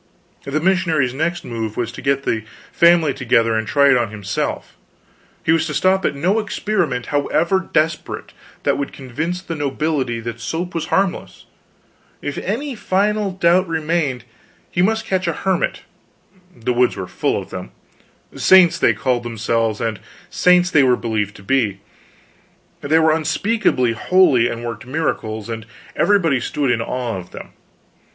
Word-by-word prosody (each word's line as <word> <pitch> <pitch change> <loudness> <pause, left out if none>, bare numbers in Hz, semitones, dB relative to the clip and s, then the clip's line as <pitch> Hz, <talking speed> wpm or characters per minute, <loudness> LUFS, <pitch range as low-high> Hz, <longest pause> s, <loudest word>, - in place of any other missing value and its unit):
The 140 +2 -1
missionary's 165 -7 +1
next 160 +5 -2
move 110 -2 -4
was 120 -1 -2
to - - -9
get 140 0 0
the 110 -4 -1 0.3
family 170 -4 +4
together 115 -3 +2
and 110 -1 -1
try 140 +2 +4
it 130 - +5
on 120 -2 0
himself; 105 -2 -4 0.7
he - - +2
was 160 -1 +2
to 150 - -4
stop 190 +3 +2
at - - 0
no 180 +10 +1
experiment, 195 - -1
however 170 +6 +1
desperate, 155 +1 -1 0.3
that - - +1
could 140 - -4
convince 160 +8 -4
the 170 - -5
nobility 145 -4 -1
that 115 0 -6
soap 165 - -4
was 165 0 -3
harmless; 190 -2 -1 0.7
if 145 - -4
any 260 +9 -3
final 210 -1 0
doubt 180 0 +2
remained, 160 -6 -1 0.5
he 175 - 0
must 220 +4 +1
catch 185 -1 -1
a 170 - +1
hermit 190 +2 -1 0.7
the 120 +1 -2
woods 125 +1 +2
were - - -4
full - - -1
of - - -10
them; - - -6 0.7
saints 185 -3 +5
they - - +4
called 125 -2 0
themselves, 115 -1 -1
and 115 -3 -2 0.3
saints 180 0 +4
they 155 - +5
were 125 -2 +4
believed 105 -3 -2
to 100 - -13
be. 110 -5 0 1.0
They 150 +3 +2
were 160 -1 +4
unspeakably 160 - +1
holy, 125 - +3
and 120 +1 -5
worked 115 0 -6
miracles, 110 -7 -2
and 115 -1 -5 0.3
everybody 170 -10 +3
stood 135 +2 -1
in 115 -1 0
awe 120 -2 -3
of 90 0 -11
them. - - -10
145 Hz, 160 wpm, -19 LUFS, 120-175 Hz, 1.0 s, it